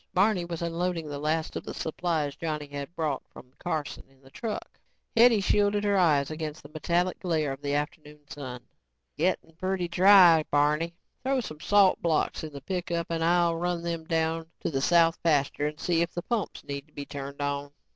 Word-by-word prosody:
Barney 190 -1 +3
was 170 -1 -5
unloading 170 -1 -2
the 145 -1 -5
last 155 +2 -1
of - - -4
the - - -7
supplies 160 -3 -2
Johnny 155 -2 -3
had 145 +3 -7
brought 150 -4 -1
from 125 0 -14
Carson 160 -4 -3
in 135 0 -26
the 135 0 -19
truck. 220 - -6 0.4
Hetty 230 -2 +6
shielded 205 +1 +2
her 205 -1 +2
eyes 155 -6 +3
against 155 -1 -5
the 145 - -12
metallic 170 +4 0
glare 160 -6 0
of 135 +1 -7
the 145 0 -1
afternoon 150 0 -4
sun. 125 -4 -7 0.5
"Gettin' 165 0 -1
pretty 185 0 -1
dry, 175 -2 +7
Barney. 150 +4 +1 0.3
Throw 265 0 +1
some 155 -11 -6
salt 200 +3 +4
blocks 160 -2 0
in 155 - -6
the 140 -1 -9
pickup 170 0 -3
and 165 -1 -1
I'll 170 0 +3
run 175 0 -2
them 165 -1 -3
down 160 -1 0
to - - -2
the 135 -2 -1
south 165 +1 +4
pasture 145 -2 +1
and 150 0 -6
see 170 -2 +1
if 170 0 -2
the 175 - -3
pumps 230 0 -3
need 140 +1 -6
to 155 - -29
be 145 - -6
turned 140 0 -7
on. 145 0 -2
165 Hz, 195 wpm, -28 LUFS, 145-175 Hz, 0.5 s, dry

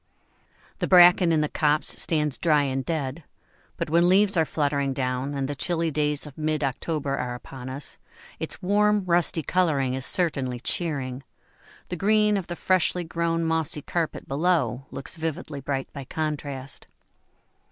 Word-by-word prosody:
] - - -32
The - - 0
bracken 175 -1 +7
in 160 -2 +3
the 150 - +1
copse 150 0 +1
stands 150 -4 0
dry 150 -4 +3
and 135 -1 -1
dead, 155 -1 -3 0.5
but - - -2
when 170 +1 +4
leaves 195 +2 +4
are 160 -2 +3
fluttering 140 -3 0
down 130 +2 -2
and 135 -1 -1
the 145 - -3
chilly 165 +3 -1
days 150 0 0
of 150 0 -11
mid 155 -1 0
October 140 +1 -2
are 125 -2 -3
upon 125 +1 -9
us, 135 +2 -5 0.4
its - - -4
warm, 205 +1 +3
rusty 170 -2 +2
colouring 145 -9 +1
is 130 0 -3
certainly 135 -7 0
cheering; 135 -3 -3 0.7
the 180 - -2
green 210 +3 +3
of 195 -3 -2
the 175 - -4
freshly 180 -1 +1
grown 165 0 -1
mossy 160 -2 0
carpet 170 -2 -3
below 135 -5 0
looks 135 - -5
vividly 160 -3 -4
bright 135 0 -2
by 140 - -6
contrast. 145 -3 -4
155 Hz, 160 wpm, -25 LUFS, 135-170 Hz, 0.7 s, bracken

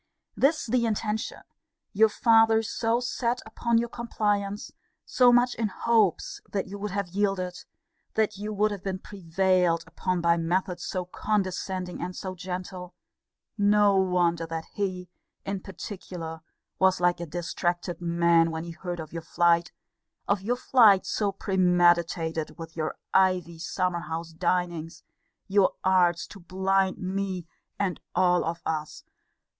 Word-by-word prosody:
This 300 +4 +2
the 235 0 +1
intention, 215 0 -2 0.5
your 220 +1 +5
father 225 -1 +4
so 230 +1 0
set 245 0 -1
upon 230 +1 0
your 235 +1 +1
compliance, 205 -4 -2 0.3
so 250 -1 +5
much 245 0 +4
in 225 - -1
hopes 215 -3 +1
that 195 - -1
you 200 +1 -8
would 210 +1 -3
have 200 -1 -3
yielded, 185 -2 -1 0.6
that 220 -1 +1
you 210 +2 -5
would 210 +1 +1
have 200 -3 -6
been 190 -1 -2
prevailed 185 -2 +1
upon 185 -1 -2
by 170 0 +3
methods 175 +2 -1
so 185 -2 -3
condescending 185 -2 -2
and 180 0 -4
so 190 -2 -5
gentle; 180 0 -6 0.6
no 205 0 +4
wonder 175 -3 +2
that 165 0 -4
he, 185 -3 -3 0.4
in 195 0 -2
particular, 180 -4 -7 0.4
was 190 -1 +4
like 175 -1 +2
a 170 - -5
distracted 175 +1 -2
man, 170 -1 +3
when 160 0 -4
he 170 - -7
heard 175 +1 -6
of 160 0 -8
your 165 - -4
flight 170 +1 +2 0.6
of 200 -1 +1
your 235 +5 0
flight 225 -7 +5
so 205 -2 0
premeditated; 175 -4 +1
with 165 -1 -9
your 155 -2 -2 0.2
ivy 185 -3 +2
summer 180 +1 -1
house 165 -1 -5
dinings, 170 -1 -2 0.4
your 200 -1 +3
arts 180 -2 +3
to 200 - -12
blind 190 +2 0
me, 190 -1 -3 0.3
and 195 -3 -1 0.2
all 180 -1 +3
of 170 +1 -4
us! 155 -1 -3
185 Hz, 140 wpm, -27 LUFS, 170-205 Hz, 0.6 s, your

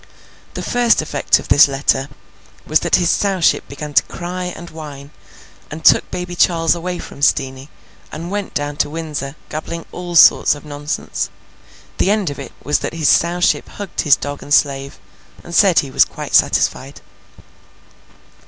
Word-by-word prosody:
The - - -4
first 240 -8 +2
effect 145 -2 +1
of - - -9
this 145 - +7
letter 135 0 0 0.6
was 155 - +2
that - - +2
his 175 -2 +2
Sowship 195 -4 +1
began 145 +1 -7
to - - +6
cry 180 +1 -6
and 175 -1 -8
whine, 145 -3 -10 0.6
and 155 +1 -9
took - - +5
Baby 180 0 -5
Charles 165 -2 +2
away 175 +1 -4
from 140 - -10
Steenie, 135 -1 0 0.4
and 170 +4 -7
went 205 -1 -4
down 145 0 -3
to 145 - 0
Windsor, 150 -3 -5
gabbling 160 +2 -6
all 175 -1 -6
sorts 155 - +6
of 145 - -13
nonsense. 145 0 -4 0.7
The - - +2
end 205 -6 +1
of 140 - -9
it 140 - -8
was 145 - +1
that - - -5
his 155 -3 +1
Sowship 175 +1 +2
hugged 205 -3 -5
his 145 -3 +5
dog 145 0 -6
and 145 - -11
slave, 140 -2 +1 0.5
and 170 - -10
said 190 -2 +4
he 135 - +2
was - - +5
quite - - -8
satisfied. - - +1
155 Hz, 165 wpm, -18 LUFS, 145-175 Hz, 0.7 s, this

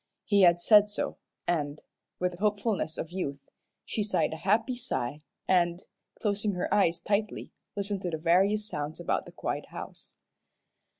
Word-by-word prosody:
He 205 -2 +4
had 175 -2 +6
said 210 +3 +6
so, 205 - -3 0.3
and, 150 -4 0 0.4
with 180 0 0
the 175 - -11
hopefulness 205 -5 0
of 165 - -4
youth, 140 -7 -5 0.3
she 220 - -2
sighed 205 -5 +1
a - - -5
happy 215 +8 +2
sigh 150 - -2 0.3
and, 175 -1 +2 0.4
closing 210 -1 0
her 180 +1 -1
eyes 175 -5 +3
tightly, 205 +4 -1 0.2
listened 200 -1 -1
to 180 - -2
the 160 - -2
various 195 +6 +3
sounds 150 -4 -4
about - - -1
the - - -10
quiet - - -3
house. - - -7
190 Hz, 160 wpm, -29 LUFS, 165-210 Hz, 0.4 s, had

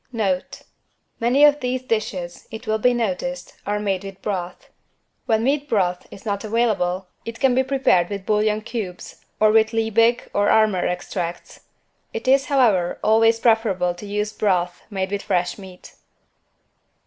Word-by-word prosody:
=Note= 195 -6 -2 0.6
Many 250 +5 +3
of 295 0 +4
these 255 -1 -2
dishes, 215 -7 -3
it 225 +2 -8
will 220 0 0
be 250 +3 +4
noticed, 240 +3 -3
are 205 0 0
made 195 -2 -1
with 195 -1 -9
broth. 180 -3 -5 0.6
When 220 0 +2
meat 285 +3 0
broth 180 -5 0
is 195 - -13
not 200 -2 -2
available, 210 -5 0 0.2
it 230 0 -7
can 265 -2 +3
be 260 - +3
prepared 260 -10 +2
with 200 -2 -5
bouillon 215 0 +1
cubes 215 -6 -7 0.2
or 215 0 +5
with 220 +1 +3
Liebig 225 +1 +2
or 205 0 +2
Armour 215 -4 +3
Extracts. 175 -1 -5 0.5
It 225 +3 -5
is, 270 +1 +4
however, 215 -11 +2
always 225 +1 +4
preferable 220 -7 +2
to 175 +4 -10
use 210 +1 -2
broth 180 -5 0
made 190 -2 -3
with 200 -1 -2
fresh 180 +2 -1
meat. 185 -2 -13
215 Hz, 155 wpm, -22 LUFS, 190-230 Hz, 0.6 s, or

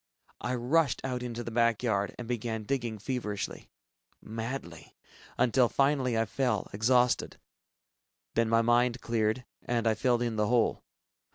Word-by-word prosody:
I 125 +1 -2
rushed 135 +3 +2
out 125 -2 -2
into 120 -1 -4
the 115 - -6
back 115 0 +2
yard, 100 -4 0
and 120 - -7
began 115 -2 -2
digging 120 -2 -2
feverishly... 105 -2 -4 0.5
madly, 110 -7 -6 0.4
until 125 0 +3
finally 135 -4 +2
I 115 - +2
fell, 110 0 -1
exhausted. 125 +4 +2 1.0
Then 115 -1 +2
my 115 0 +4
mind 120 +1 +3
cleared 115 +1 0 0.2
and 120 -1 -1
I 110 - +4
filled 120 +2 +1
in 115 -2 -2
the 105 0 +2
hole. 120 0 +2
120 Hz, 145 wpm, -30 LUFS, 110-125 Hz, 1.0 s, my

